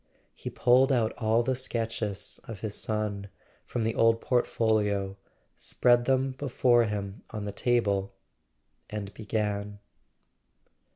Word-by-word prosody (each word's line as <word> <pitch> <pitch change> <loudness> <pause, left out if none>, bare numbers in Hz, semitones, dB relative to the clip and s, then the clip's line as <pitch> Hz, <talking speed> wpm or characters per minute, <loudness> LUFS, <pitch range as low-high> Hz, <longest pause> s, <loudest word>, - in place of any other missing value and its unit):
He - - -6
pulled 130 +2 +4
out 115 -4 +2
all 115 +1 +3
the 130 - +1
sketches 115 -5 -3
of 115 -6 -8
his 110 -2 -3
son 105 -2 -2 0.4
from 120 - -2
the 115 0 0
old 115 0 +4
portfolio, 105 -5 +1 0.4
spread 120 -1 +3
them 135 0 +2
before 125 -3 +3
him 100 -1 -4
on 105 -2 -5
the 100 - -3
table, 100 -4 0 0.7
and 105 -2 -5
began. 105 -1 -2
110 Hz, 120 wpm, -28 LUFS, 100-120 Hz, 0.7 s, pulled